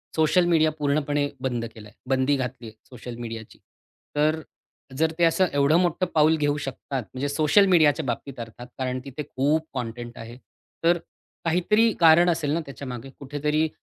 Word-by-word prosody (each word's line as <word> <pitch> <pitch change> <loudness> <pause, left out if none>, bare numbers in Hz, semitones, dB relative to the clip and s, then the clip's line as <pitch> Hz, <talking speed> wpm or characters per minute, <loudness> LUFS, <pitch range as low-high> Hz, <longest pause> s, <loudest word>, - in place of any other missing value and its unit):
Social 160 +3 +3
media 160 -2 +3
पूर्णपणे 145 0 0
बंद 120 -3 -2
केलाय. 105 -2 -12 0.2
बंदी 135 +2 +2
घातली 125 -2 -5
आहे 110 - -12
सोशल 125 -1 -8
मीडियाची. 115 -2 -8 0.6
तर 155 +2 +2 0.6
जर 160 +2 +2
ते - - +3
असं 165 +3 +3
एवढं 145 +3 +4
मोठं 175 +1 +1
पाऊल 155 +1 +5
घेऊ 145 -1 +1
शकतात 135 -1 -4
म्हणजे 135 +2 -2
सोशल 155 +7 +4
मीडियाच्या 160 -4 +4
बाबतीत 125 +2 -4
अर्थात, 115 +1 -8
कारण 130 -1 -2
तिथे 140 +2 -6
खूप 150 +4 0
कंटेंट 120 0 -5
आहे. 115 +1 -9 0.5
तर 170 +1 +4 0.5
काहीतरी 210 +7 +3
कारण 170 +1 +6
असेल 160 -4 0
ना 165 - +1
त्याच्यामागे, 135 -2 -7
कुठेतरी 150 +3 0
145 Hz, 155 wpm, -25 LUFS, 125-160 Hz, 0.6 s, कारण